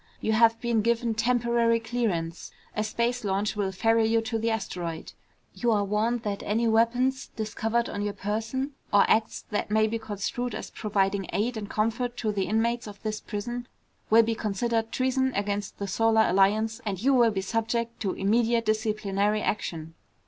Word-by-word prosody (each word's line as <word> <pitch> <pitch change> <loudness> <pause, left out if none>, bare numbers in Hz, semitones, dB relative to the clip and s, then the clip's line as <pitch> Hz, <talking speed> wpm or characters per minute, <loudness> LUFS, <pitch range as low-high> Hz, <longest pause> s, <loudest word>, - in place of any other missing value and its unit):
"You 220 - -1
have 230 +1 +4
been 235 -2 +1
given 235 +1 +1
temporary 235 0 +2
clearance. 220 -8 -2 0.3
A 215 - 0
space 235 +3 -1
launch 200 +1 0
will 200 -2 -1
ferry 225 +3 +2
you 225 +1 +3
to 225 0 -2
the 230 +1 0
asteroid. 180 -7 -4 0.4
You 240 - -1
are 205 -2 +2
warned 220 +4 0
that 200 -1 -3
any 230 +3 0
weapons 245 +4 +2
discovered 225 +1 -1
on 205 - -4
your 205 0 -2
person, 225 +7 -2 0.2
or 205 -1 +6
acts 220 0 +1
that 210 - -1
may 215 +1 +3
be 225 +1 -2
construed 220 +3 -3
as - - -6
providing 195 -2 0
aid 235 +4 0
and 210 -2 -5
comfort 235 +3 -1
to 220 -3 -1
the 195 -2 -1
inmates 235 +2 0
of 205 -1 -10
this 215 -1 -3
prison, 240 +3 -5 0.4
will 225 +1 +7
be 225 +1 0
considered 225 +1 -1
treason 260 0 +1
against 205 0 -2
the 200 - -3
Solar 220 +3 +3
Alliance 215 +4 +2
and 195 -4 -3
you 270 +6 +3
will 240 -3 +5
be 200 -3 -2
subject 230 +3 -2
to 195 -3 -1
immediate 230 +3 +2
disciplinary 215 -1 0
action." 165 -6 -3
220 Hz, 175 wpm, -27 LUFS, 205-235 Hz, 0.4 s, will